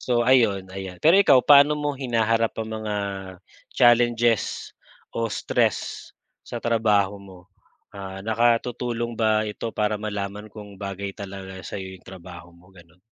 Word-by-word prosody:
So 120 -1 +1
ayun, 105 -7 +3
ayan. 95 -2 -7
Pero 165 +5 +6
ikaw, 135 -10 +6
paano 145 +1 +6
mo 145 0 -1
hinaharap 115 -3 0
ang 110 - -8
mga, 105 -1 -3 0.8
challenges 120 -2 +2 0.4
o 115 0 -1
stress, - - -1 0.4
sa 120 - -5
trabaho 105 -4 +2
mo? 95 -2 -13 0.5
Ah, 95 -1 -8
nakatutulong 120 +1 0
ba 110 -1 +2
ito 105 +2 -5
para 105 0 0
malaman 105 -1 -5
kung 105 -2 -11
bagay 100 0 -5
talaga 95 -1 -8
sa'yo 95 -1 -7
yung - - -29
trabaho 90 -2 -11
mo, 90 +2 -21
gano'n? 85 -1 -19
105 Hz, 135 wpm, -24 LUFS, 95-120 Hz, 0.8 s, Pero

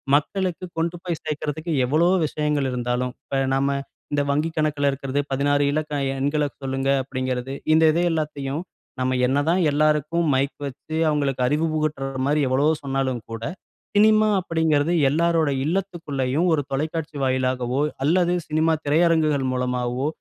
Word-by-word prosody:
மக்களுக்கு 185 +3 -1
கொண்டு 165 +1 -1
போய் 170 -3 -3
சேர்க்கறதுக்கு 155 +2 -3
எவ்வளவோ 170 +7 +3
விஷயங்கள் 150 -3 -1
இருந்தாலும், 125 0 -1
இப்ப 135 - -2 0.2
நாம 140 +1 +1 0.4
இந்த 145 - +2
வங்கி 150 +3 +1
கணக்குல 150 -2 +1
இருக்கறதே, 135 +1 -2
"16 145 +1 +2
இலக்க 150 0 -2 0.3
எண்கள 145 +2 +1 0.2
சொல்லுங்க" 135 0 -1
அப்டிங்கிறது. 130 0 -3 0.2
இந்த 160 +1 +5
இது 170 - +1
எல்லாத்தையும் 150 -2 -2 0.4
நம்ம 130 0 0
என்னதான் 150 +7 +2
எல்லாருக்கும் 150 +3 +1
மைக் 140 +2 0
வச்சு, 155 +4 -8
அவங்களுக்கு 140 -4 0
அறிவு 155 +4 +1
புகட்டுற 150 -3 -1 0.2
மாரி 150 +1 +2
எவ்வளவோ 145 +5 +3
சொன்னாலும் 135 -4 -1
கூட, 115 0 -5 0.5
சினிமா 215 +1 +5
அப்படீங்கிறது 160 -2 +1 0.2
எல்லாருடைய 160 -2 +2
இல்லத்துக்குள்ளயும், 165 -4 -1
ஒரு 145 - +2
தொலைக்காட்சி 155 +2 -3
வாயிலாகவோ 130 0 0 0.2
அல்லது 175 +2 +3
சினிமா 160 +1 +2
திரையரங்குகள் 155 -2 +3
மூலமாவோ 125 +1 -1
145 Hz, 130 wpm, -23 LUFS, 135-160 Hz, 0.5 s, இந்த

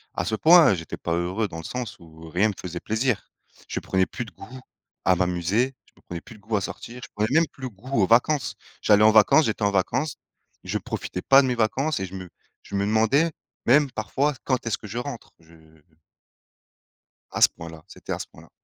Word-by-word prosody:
à - - -1
ce 110 - -1
point 160 - +7
j'étais 80 -3 -5
pas 85 - -3
heureux 90 +5 -1
dans 85 -4 -8
le 80 - -7
sens 125 +1 -5
où 80 -1 -13
rien 95 +6 +2
me - - -3
faisait 90 -1 -5
plaisir. 110 +3 -1 0.4
Je - - -3
prenais 95 0 +1
plus 125 - -5
de 110 - -13
goût 130 +4 -11 0.5
à 95 - +5
m'amuser, 90 +8 0
je - - -27
prenais 85 -1 -6
plus 115 - -13
de - - -21
goût 110 +1 -2
à 100 - -1
sortir, 120 +6 -7
je - - -9
prenais 105 +1 0
même 165 - +1
plus 135 - -15
le 130 - -2
goût 115 +3 -2
aux 95 - +3
vacances. 130 +4 +2 0.3
J'allais 105 0 +5
en 110 - +7
vacances, 110 +8 +6
j'étais 110 -1 -2
en 100 - +3
vacances, 115 +10 0 0.5
je - - -2
profitais 90 - -5
pas 135 +6 +6
de 135 - 0
mes 125 - 0
vacances 130 +5 0
et 95 - -2
je 95 - -9
me 95 -1 -8 0.3
je - - -7
me 100 0 +1
demandais 110 +10 +3 0.3
même 140 +3 +5
parfois: 130 +7 -1
«Quand 130 -3 0
est-ce 115 - -1
que 105 - -11
je 110 - -6
rentre», 125 -1 -6
je 80 0 -20 1.8
À - - -4
ce - - +8
point-là, 80 -1 -11
c'était - - -7
à - - -4
ce - - -6
point-là. - - -17
110 Hz, 220 wpm, -24 LUFS, 95-125 Hz, 1.8 s, ce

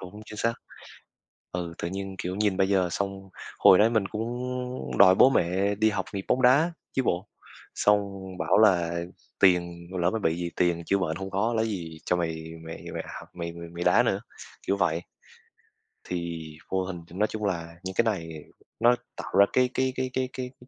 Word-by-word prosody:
đúng, 95 +3 -10
chính 105 - -10
xác. 115 +2 +1 1.0
Ừ, 85 -2 -4
tự 85 - -3
nhiên, 95 +1 -5
kiểu, 90 +1 -3
nhìn 105 -2 +1
bây 95 0 +2
giờ 95 -3 +3
xong 95 0 -4 0.3
hồi 95 - +8
đấy 110 +2 +6
mình 110 -4 +1
cũng 110 +3 -3 0.7
đòi 95 -1 +8
bố 130 - +7
mẹ 95 -1 +1
đi 110 +2 +3
học 95 -3 -2
nghiệp 95 -1 -4
bóng 130 - +2
đá 145 +7 +5 0.2
chứ 130 - +1
bộ. 90 +1 -1 0.5
Xong 105 0 +4 0.4
bảo - - +3
là 85 -5 +4 0.4
tiền 85 -2 +3
mà 95 - -4
lỡ 85 +1 +3
mà 115 - -1
bị 80 -5 +1
gì, 85 -1 -3
tiền 85 -1 +1
chữa 100 - +2
bệnh 85 -4 -1
không 95 0 -5
có, 110 +5 +1
lấy 110 0 +1
gì 85 -6 -5
cho 90 - +2
mày 85 -2 -1 0.3
mày 80 - -8
mày - - -3 0.2
học - - -13
mày 85 -1 -5
mày 85 0 -8
mày 85 +1 -5
đá - - +5
nữa, - - +1 0.5
kiểu 100 - +2
vậy. 85 -3 +1 1.0
Thì 85 -2 -4 0.3
vô 95 0 0
hình 90 -2 -6
nói 105 +5 +1
chung 105 -1 -4
là 85 -3 -3
những 95 0 -5
cái - - +4
này 95 -7 -1 0.5
nó 120 +1 +5 0.2
tạo - - -7
ra 100 - +9
cái 125 0 +3
cái 130 0 0
cái 130 0 -1
cái 130 -1 -1
cái 125 -1 -4
cái 125 - -16
95 Hz, 205 wpm, -27 LUFS, 85-110 Hz, 1.0 s, ra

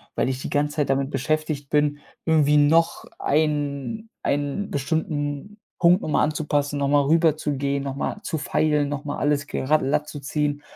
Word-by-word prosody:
Weil - - +1
ich 130 0 -3
die - - -5
ganze 145 0 0
Zeit 145 -2 +1
damit 135 0 +1
beschäftigt 150 0 -2
bin, 150 -1 +2 0.3
irgendwie 150 -2 +4
noch 160 +3 +3 0.2
einen 150 +8 -1
einen 145 +8 -1
bestimmten 145 +5 -2 0.2
Punkt 175 +3 +5
noch - - -4
mal - - +3
anzupassen, 145 -1 0
noch 140 - +1
mal 145 0 +4
rüberzugehen, 145 -3 +1
noch 135 -1 -4
mal 205 - -3
zu 160 - -2
feilen, 150 0 +1
noch 145 0 -4
mal 145 - -3
alles 145 0 0
gera 150 +3 +1
latt 150 +1 0
zu 150 - -7
ziehen 145 +1 -2
145 Hz, 175 wpm, -24 LUFS, 140-155 Hz, 0.3 s, Punkt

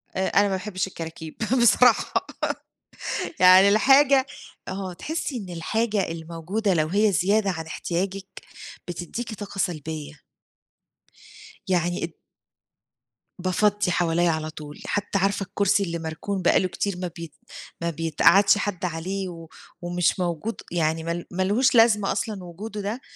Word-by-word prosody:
آآ 190 0 0
أنا 200 - +4
ما 205 - +1
باحبش 190 0 -3
الكراكيب 160 -3 -8 0.3
بصراحة. 240 +1 +4 1.1
يعني 185 +2 +8
الحاجة 270 +5 +5 0.4
آه 190 -1 -4
تحسي 295 - -4
إن 195 -5 -7
الحاجة 205 +5 -1
الموجودة 170 +6 -2
لو 155 -2 +1
هي 205 +4 +2
زيادة 195 +4 +2
عن 160 -2 -5
إحتياجِك 190 +4 -3 0.6
بتديكِ 180 +7 -5
طاقة 200 -1 -8
سلبية. 155 -4 -4 1.5
يعني 175 -1 0
ال 165 - -11 1.3
بافضّي 195 +2 +1
حواليَّ 175 0 +2
على 155 -1 -1
طول. 150 -1 -10
حتى 205 -1 -1
عارفة 195 +1 +1
الكرسي 200 +1 +1
اللي 170 -2 -3
مركون 165 +5 -4
بَقى 175 - +4
له 185 - 0
كتير 190 +1 -3
ما 180 0 -3
بي 165 -3 -8 0.5
ما 170 - 0
بيتقَعدش 170 +5 +4
حد 205 -2 -3
عليه 185 +3 -3
و، 165 -2 -10 0.3
ومش 175 +1 0
موجود، 180 +5 -3
يعني 160 -1 0
مال 170 +1 -3
مالهوش 205 +9 +2
لازمة 220 -3 +5
أصلًا 210 -2 -3
وجوده 205 +5 -7
ده. 215 +6 -4
185 Hz, 130 wpm, -24 LUFS, 170-205 Hz, 1.5 s, يعني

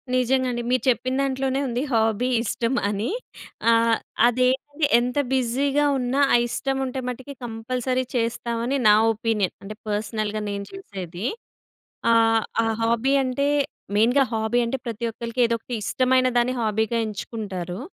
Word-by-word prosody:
నిజంగా 255 +1 +2
అండి. 240 0 -2
మీరు 255 - +2
చెప్పిన 255 +1 0
దాంట్లోనే 270 0 0
ఉంది, 245 0 -1
హాబీ 225 +1 +2 0.2
ఇష్టం 235 +2 -1 0.2
అని. 205 +2 -2 0.6
ఆహ్, 230 0 +4 0.3
అదేంటంటే, 260 +5 +1
ఎంత 245 +3 -2 0.2
బిజీగా 270 +3 +1
ఉన్నా 255 +2 -1
ఆ - - +7
ఇష్టం 270 +3 -2
ఉంటే 260 0 -4
మటికి 260 +3 -7
కంపల్సరీ 250 +3 -2
చేస్తామని, 235 +2 -1
నా 210 - +8 0.2
ఒపీనియన్. 215 -3 -1
అంటే, 210 +2 -7
పర్సనల్‌గా 215 0 -2
నేను 200 0 -4
చేసేది. 190 - -7 0.9
ఆహ్, 225 -1 +4 0.2
ఆ - - 0 0.2
హాబీ 235 +4 +2
అంటే, 260 +2 0 0.5
మెయిన్‍గా 245 +6 +4
హాబీ 220 +2 +1
అంటే 250 +3 -2
ప్రతి 230 -1 -5
ఒక్కరికి 230 +2 -3
ఏదో 230 - +1
ఒకటి 240 +2 -6
ఇష్టమైన 255 +2 +2
దాన్ని 240 +1 +2
హాబీగా 220 +1 0
ఎంచుకుంటారు. 195 -4 -5
235 Hz, 135 wpm, -24 LUFS, 220-255 Hz, 0.9 s, నా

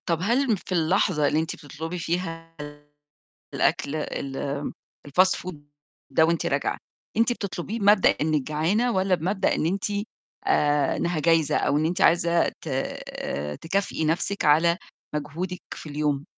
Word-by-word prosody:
طَب 170 -2 +1
هل 240 +6 +2
م - - +4
في 190 - -12
اللحظة 170 -2 +2
اللي 150 - +2
أنتِ 160 0 -2
بتطلبي 160 +4 -6
فيها 165 -1 -3 1.0
الأكل 145 +2 +1
ال 140 -3 -4 0.7
الfast 185 +6 +4
food 185 -3 -7 0.5
ده 160 - +4
وأنتِ 165 +1 +1
راجعة، - - 0 0.4
أنتِ 230 +2 +3
بتطلبيه 200 0 -4
بمبدأ 205 -1 +6
إنِّك 155 -1 0
جعانة 170 - +1
والّا 190 -1 +2
بمبدأ 190 +4 0
إن - - 0
أنتِ 190 +3 -1 0.6
آآ 145 -1 +2
إنّها 170 -1 -1
جايزة 165 -1 +3
أو 145 - +2
إن 155 - +1
أنتِ 175 +3 -2
عايزة 170 -1 +4
ت - - -10
آآ 75 +1 -4
تكافئي 185 -1 -1
نَفْسِك 170 +5 0
على 165 +4 +4 0.4
مجهودِك 175 +5 -4
في - - -9
اليوم؟ 145 -1 -1
165 Hz, 145 wpm, -25 LUFS, 150-185 Hz, 1.0 s, بمبدأ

